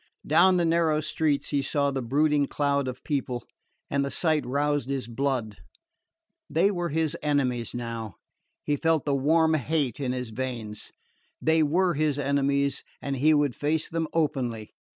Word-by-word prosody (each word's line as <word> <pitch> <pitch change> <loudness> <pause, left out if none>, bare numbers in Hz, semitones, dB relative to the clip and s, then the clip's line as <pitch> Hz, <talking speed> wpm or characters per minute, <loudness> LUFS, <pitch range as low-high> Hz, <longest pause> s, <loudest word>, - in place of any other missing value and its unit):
Down 180 +4 +5
the 175 - +2
narrow 165 -2 +2
streets 155 -1 0
he 140 -2 +1
saw 140 +1 0
the 135 -1 -2
brooding 145 +3 +2
cloud 140 -2 0
of 125 0 -6
people, 130 -5 -2 0.4
and 140 0 0
the 140 - -2
sight 155 0 +2
roused 145 0 0
his 135 -3 -2
blood. 120 -3 -2 0.9
They 190 +6 +3
were 175 -3 -2
his 160 +1 0
enemies 130 -6 0
now 115 -4 -5 0.5
he 145 -1 0
felt 160 -1 +1
the 145 - +1
warm 160 +4 +3
hate 145 -4 0
in 130 -3 -1
his 125 -2 -4
veins. 115 -3 -5 0.5
They 160 0 +3
were 175 +4 +2
his 150 -2 0
enemies, 140 0 0 0.2
and 140 -1 -3
he 155 +4 +4
would 145 -3 +2
face 155 +4 0
them 165 -1 -2
openly. 125 -9 -1
140 Hz, 160 wpm, -26 LUFS, 130-155 Hz, 0.9 s, Down